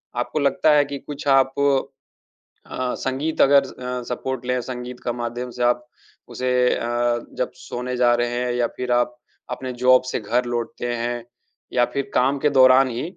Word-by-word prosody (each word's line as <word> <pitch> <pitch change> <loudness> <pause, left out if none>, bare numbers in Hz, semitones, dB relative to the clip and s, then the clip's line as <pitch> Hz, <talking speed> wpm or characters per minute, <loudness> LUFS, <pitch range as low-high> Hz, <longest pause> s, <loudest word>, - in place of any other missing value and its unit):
आपको 120 +5 -2
लगता 145 +2 +3
है 145 -1 +4
कि 140 0 -5
कुछ 145 0 -8
आप 135 -1 +4 1.1
अ, 130 -1 -3
संगीत 135 +4 -2
अगर 140 0 +7
अ, 125 -2 -6
सपोर्ट 125 0 -4
लें, 125 0 0
संगीत 125 0 -7
का 120 - 0
माध्यम 120 +1 -4
से 120 +1 -3
आप 120 0 +1 0.4
उसे 125 0 -2 0.2
अ, 120 0 0
जब 125 - -2
सोने 125 +1 -5
जा 120 -1 +4
रहे 120 0 0
हैं 125 - -1
या 120 -1 +1
फिर 125 -1 -3
आप 120 0 +1 0.4
अपने 130 -1 -4
जॉब 125 +1 +5
से - - -1
घर 120 +4 0
लौटते 120 0 -3
हैं। 120 0 -3 0.5
या 120 -1 +4
फिर 140 -1 -2
काम 135 +3 +2
के 150 - +2
दौरान 130 -1 +6
ही, 120 0 -4
125 Hz, 180 wpm, -22 LUFS, 120-130 Hz, 1.1 s, अगर